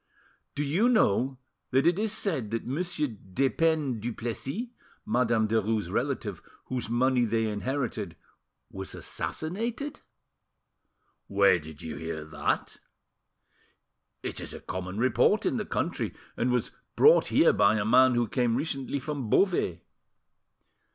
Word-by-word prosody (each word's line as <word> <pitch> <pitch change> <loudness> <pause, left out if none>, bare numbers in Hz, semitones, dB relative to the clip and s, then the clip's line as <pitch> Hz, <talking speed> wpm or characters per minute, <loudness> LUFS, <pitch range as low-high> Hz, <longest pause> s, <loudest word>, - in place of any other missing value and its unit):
Do 145 - -1
you 175 - +2
know 130 - +2 0.3
that 135 +3 +2
it 175 +3 +3
is 215 -1 0
said 155 - -1
that 115 +1 -3
Monsieur 160 +3 -1
Despeignes 135 - 0
Duplessis, 120 - -4 0.4
Madame 115 -1 +2
Derues' 110 -1 0
relative, - - -2 0.2
whose 125 -3 -3
money 125 +1 +3
they 115 0 +1
inherited, 110 - -3 0.6
was 95 0 -6
assassinated?" 225 - -4 1.3
"Where 100 -3 +4
did 80 -1 -11
you 80 -2 -5
hear 80 0 -5
that?" 75 -1 -2 1.5
"It - - -4
is - - -6
a - - -7
common 95 +1 -5
report 125 +1 +3
in - - +1
the - - -2
country, - - -2 0.2
and 120 - 0
was 125 -2 0 0.2
brought - - +6
here - - +5
by 100 +1 +4
a 105 -2 0
man 130 +2 +5
who 120 -1 +2
came 120 -2 +1
recently 135 0 -2
from 140 -4 -4
Beauvais." 105 - +2
120 Hz, 130 wpm, -28 LUFS, 105-145 Hz, 1.5 s, brought